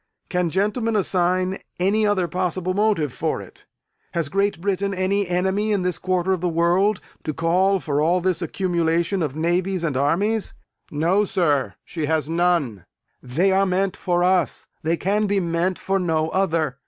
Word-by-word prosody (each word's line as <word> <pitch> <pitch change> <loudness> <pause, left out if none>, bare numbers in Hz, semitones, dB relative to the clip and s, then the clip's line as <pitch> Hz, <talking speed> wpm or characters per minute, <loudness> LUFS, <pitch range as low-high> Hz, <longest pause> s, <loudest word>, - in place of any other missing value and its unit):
Can 180 -2 0
gentlemen 210 +6 0
assign 185 -1 +1 0.2
any 210 +4 +2
other 190 -4 +1
possible 185 +1 -1
motive 200 - +1
for - - -2
it? - - -13 0.5
Has 165 -4 -1
Great 195 -1 0
Britain 200 +1 -1
any 190 +1 0
enemy, 190 +4 0
in 200 -3 +1
this 180 -1 -1
quarter 185 0 0
of 185 - -2
the 180 - 0
world, 175 +5 +2 0.2
to 155 - -3
call 185 +4 +2
for 145 -4 -1
all 170 +4 +3
this 185 0 -1
accumulation 170 +1 0
of 145 -4 -2
navies 175 +3 0
and 150 -5 -1
armies? 190 +11 0 0.3
No, 170 +7 +2
sir, 160 -8 0
she 160 -4 -4
has 155 -1 0
none. 165 - 0 0.3
They 165 +10 +1
are 195 +1 +3
meant 185 +1 0
for 175 -1 0
us; 180 -1 +1 0.2
they 165 +2 0
can 205 +4 0
be 200 0 +1
meant 175 +1 0
for 195 0 -1
no 160 -3 0
other. 160 -7 0
180 Hz, 165 wpm, -22 LUFS, 165-195 Hz, 0.5 s, all